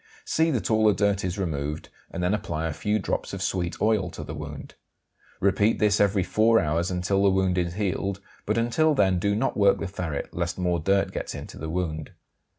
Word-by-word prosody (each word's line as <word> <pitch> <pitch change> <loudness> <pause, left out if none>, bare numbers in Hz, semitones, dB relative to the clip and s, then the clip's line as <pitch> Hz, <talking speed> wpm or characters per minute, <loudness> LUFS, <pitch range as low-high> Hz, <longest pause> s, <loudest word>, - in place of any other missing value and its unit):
See 160 +1 +2
that 120 - -1
all 110 0 +4
the 105 - +4
dirt 100 -1 +1
is 90 +1 -2
removed, 75 -5 -3 0.2
and 90 - -4
then 90 +3 +2
apply 85 -6 -2
a 80 - -2
few 105 +6 0
drops 100 - -3
of 95 -1 -3
sweet 90 -2 -2
oil 105 -4 +2
to 80 - -8
the 75 - -7
wound. 75 -2 -8 0.7
Repeat 100 +3 +2
this 105 -1 +3
every 100 -1 +3
four 110 +5 +3
hours, 80 +3 0
until 95 +2 0
the 100 - +5
wound 95 -1 +2
is 85 -1 -2
healed, 100 -1 -1 0.3
but 105 +2 +1
until 145 +7 +2
then 95 -6 +3
do 100 +3 +1
not 125 +5 0
work 100 -1 +4
the - - -4
ferret 85 -6 -4
lest 85 0 -2
more 90 -2 0
dirt 95 +5 +1
gets - - -5
into - - -8
the 80 +1 -5
wound. 80 -3 -3
95 Hz, 210 wpm, -26 LUFS, 85-105 Hz, 0.7 s, the